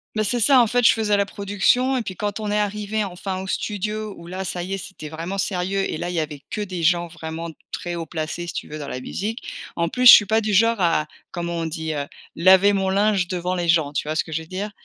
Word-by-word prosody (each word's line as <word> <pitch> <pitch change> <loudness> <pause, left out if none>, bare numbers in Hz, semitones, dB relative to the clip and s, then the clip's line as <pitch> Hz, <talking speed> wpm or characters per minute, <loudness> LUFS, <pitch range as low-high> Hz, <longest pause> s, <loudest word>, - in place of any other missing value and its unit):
Mais 215 - +1
c'est 240 +4 0
ça, 255 +3 +6
en 240 - +6
fait, 245 +2 +1
je - - +8
faisais 215 -2 +1
la 200 - +2
production, 205 +7 +1
et 250 - 0
puis 195 -4 -6
quand 205 +2 -3
on 210 -1 -3
est 210 - +1
arrivés 210 +1 -1
enfin 190 0 -4
au 190 - -7
studio 210 +1 -3
où 170 - -12
là, 185 +2 -5
ça 180 -1 -3
y 190 +2 -4
est, - - -1
c'était 185 -6 -8
vraiment 170 +5 -5
sérieux 195 0 -1
et - - -3
là, 175 - -3
il 180 - -4
y 165 - +1
avait 150 -2 -4
que 210 - -3
des 185 -4 -4
gens 175 +1 +2
vraiment 165 0 -6 0.2
très 175 0 -4
haut 165 -2 -4
placés, 165 +2 -4
si - - -5
tu - - -5
veux, 155 - -7
dans 145 - -6
la 130 - -5
musique. 215 - -4 0.3
En 170 0 0
plus, 250 +7 +3
je - - +14
suis 210 - +9
pas 220 +2 +2
du 215 0 -1
genre 230 +3 +3
à 165 -3 +2 0.2
comment 170 -1 -4
on 165 - -2
dit, 160 0 -4
heu? 145 -1 -3 0.3
Laver 190 +3 +6
mon 195 -1 0
linge 200 -1 +2
devant 180 0 -2
les 175 -2 -2
gens, 160 -3 +2
tu 150 - -2
vois 155 - -2
ce - - +1
que 160 - -12
je 160 - -2
veux 160 - -12
dire? 200 +3 -4
185 Hz, 280 wpm, -22 LUFS, 170-210 Hz, 0.3 s, je